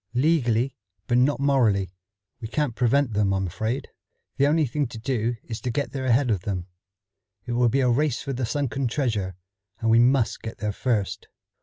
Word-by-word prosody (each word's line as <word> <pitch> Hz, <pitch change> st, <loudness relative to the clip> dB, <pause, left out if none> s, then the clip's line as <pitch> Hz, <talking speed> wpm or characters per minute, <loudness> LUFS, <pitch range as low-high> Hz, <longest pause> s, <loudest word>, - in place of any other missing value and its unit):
"Legally, 130 Hz, -3 st, +2 dB, 0.3 s
but 120 Hz, -1 st, +2 dB
not 140 Hz, +3 st, +2 dB
morally. 115 Hz, -10 st, +2 dB, 0.5 s
We 115 Hz, -, -5 dB
can't 145 Hz, +1 st, -1 dB
prevent 125 Hz, +1 st, +2 dB
them, 100 Hz, -1 st, +2 dB
I'm 95 Hz, 0 st, 0 dB
afraid. 110 Hz, +8 st, -3 dB, 0.5 s
The 140 Hz, -, +4 dB
only 155 Hz, +1 st, +3 dB
thing 140 Hz, +2 st, -1 dB
to 115 Hz, -, -9 dB
do 120 Hz, 0 st, -1 dB
is 115 Hz, -1 st, -6 dB
to 125 Hz, -, -2 dB
get 125 Hz, +1 st, -2 dB
there 135 Hz, -2 st, -4 dB
ahead 125 Hz, 0 st, +3 dB
of 100 Hz, -5 st, 0 dB
them. 90 Hz, -3 st, -3 dB, 0.8 s
It -, -, -5 dB
will 120 Hz, 0 st, +3 dB
be 135 Hz, +4 st, +2 dB
a 130 Hz, -, +3 dB
race 140 Hz, +1 st, +1 dB
for 135 Hz, +1 st, -3 dB
the 125 Hz, -2 st, -2 dB
sunken 135 Hz, 0 st, -1 dB
treasure, 110 Hz, -, -1 dB, 0.4 s
and 115 Hz, 0 st, +1 dB
we 115 Hz, -, +6 dB
must 125 Hz, 0 st, +3 dB
get 115 Hz, -, -7 dB
there 105 Hz, -1 st, -2 dB
first." 105 Hz, -5 st, -1 dB
120 Hz, 190 wpm, -25 LUFS, 110-135 Hz, 0.8 s, we